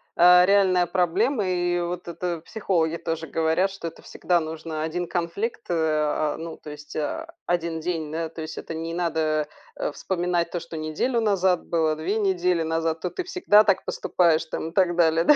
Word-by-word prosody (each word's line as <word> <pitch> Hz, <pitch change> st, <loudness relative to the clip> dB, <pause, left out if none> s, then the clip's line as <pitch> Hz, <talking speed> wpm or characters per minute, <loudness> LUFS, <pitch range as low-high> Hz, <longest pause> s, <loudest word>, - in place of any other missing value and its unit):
а, 180 Hz, +1 st, +7 dB
реальная 185 Hz, -2 st, +4 dB
проблема. 190 Hz, -, +1 dB
И 175 Hz, -1 st, 0 dB
вот 175 Hz, +1 st, -4 dB
это 170 Hz, -1 st, -3 dB
психологи 170 Hz, -6 st, 0 dB
тоже 165 Hz, -1 st, -4 dB
говорят, 160 Hz, +5 st, +1 dB
что 190 Hz, -3 st, -6 dB
это 165 Hz, -, -9 dB
всегда 175 Hz, -1 st, 0 dB
нужно 160 Hz, -1 st, -5 dB
1 170 Hz, +2 st, -2 dB
конфликт, 185 Hz, +8 st, -2 dB
а, 155 Hz, -2 st, +1 dB
ну 165 Hz, 0 st, -7 dB
то -, -, -11 dB
есть, 150 Hz, 0 st, -11 dB
а, 320 Hz, -, -3 dB, 0.2 s
1 170 Hz, -2 st, -1 dB
день, 160 Hz, -3 st, -3 dB
да. 165 Hz, 0 st, -3 dB
То 160 Hz, -, -8 dB
есть 155 Hz, -, -6 dB
это -, -, -6 dB
не 165 Hz, +1 st, -4 dB
надо, 155 Hz, -3 st, 0 dB, 0.3 s
э, -, -, -2 dB
вспоминать 175 Hz, 0 st, -1 dB
то, 175 Hz, -, -2 dB
что 170 Hz, -1 st, -8 dB
неделю 155 Hz, +11 st, -1 dB
назад 190 Hz, -4 st, +2 dB
было, 160 Hz, -2 st, +1 dB
2 180 Hz, +8 st, -1 dB
недели 180 Hz, -4 st, +1 dB
назад, 160 Hz, 0 st, -1 dB
то 180 Hz, -, -1 dB
ты 370 Hz, -, -4 dB
всегда 215 Hz, -, +4 dB
так 200 Hz, -3 st, +1 dB
поступаешь 165 Hz, -3 st, +2 dB
там 160 Hz, 0 st, -4 dB
и -, -, -13 dB
так 180 Hz, -3 st, +3 dB
далее, 165 Hz, -1 st, +3 dB
да. 300 Hz, -, +7 dB
170 Hz, 190 wpm, -25 LUFS, 160-180 Hz, 0.3 s, а